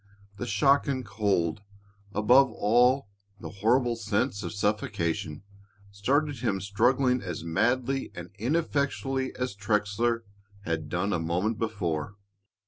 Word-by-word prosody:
The 120 - -4
shock 135 +7 +3
and 130 -2 -2
cold, 100 -3 0 0.5
above 125 +7 +5
all 125 +4 +3 0.3
the - - -7
horrible 120 +2 +3
sense 110 0 -1
of 85 - -4
suffocation, 100 -6 -2 0.5
started 140 +8 0
him 95 -3 0
struggling 125 +6 +2
as 90 -4 -5
madly 125 +10 0
and 85 +2 -8
ineffectually 135 -1 0
as 125 -4 -2
Trexler 105 +3 0 0.4
had 80 -5 -3
done 95 +4 -1
a - - 0
moment 90 +7 -1
before. 100 -5 -2
105 Hz, 120 wpm, -28 LUFS, 100-125 Hz, 0.5 s, above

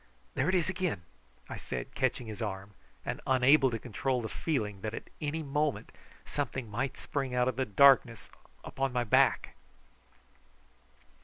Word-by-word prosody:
"There - - +1
it 190 - +2
is 175 -3 +2
again!" 180 - -2 0.4
I - - -6
said, - - -6
catching 130 -1 0
his 110 +1 -7
arm, 100 -1 -4 0.3
and - - -3
unable 130 +2 +5
to 115 - -2
control 125 +3 -2
the 110 - -4
feeling 105 -11 -2
that 110 +1 -3
at - - -9
any 155 +2 -2
moment 145 0 -1 0.3
something 130 -5 -3
might 130 +5 -2
spring 135 -3 -3
out 125 0 +3
of 130 - 0
the 130 +1 0
darkness 120 0 +5 0.4
upon 135 -1 -2
my 125 -1 +1
back. 115 - +3
130 Hz, 155 wpm, -31 LUFS, 110-140 Hz, 0.4 s, unable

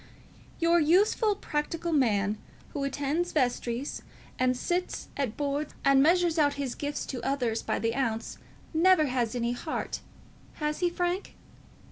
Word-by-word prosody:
"Your 335 +1 +4
useful, 400 +6 +3
practical 335 +1 -2
man, 210 -7 +2 0.3
who 285 - -4
attends 290 +5 -1
vestries, 250 -1 -1 0.4
and 255 0 +2
sits 355 +6 -2
at 270 -6 -2
Boards, 290 +1 -2
and 275 -1 +6
measures 340 +1 +3
out 285 -2 +3
his 275 -3 -3
gifts 290 0 -3
to 255 - -5
others 245 -5 0
by - - -1
the 230 0 0
ounce, 230 -4 -2 0.3
never 335 0 +5
has 250 -4 -1
any 235 0 0
heart. 305 +6 -3 0.5
Has 300 -1 -2
he, 355 - +2
Frank?" 355 +2 -2
285 Hz, 140 wpm, -28 LUFS, 250-335 Hz, 0.5 s, and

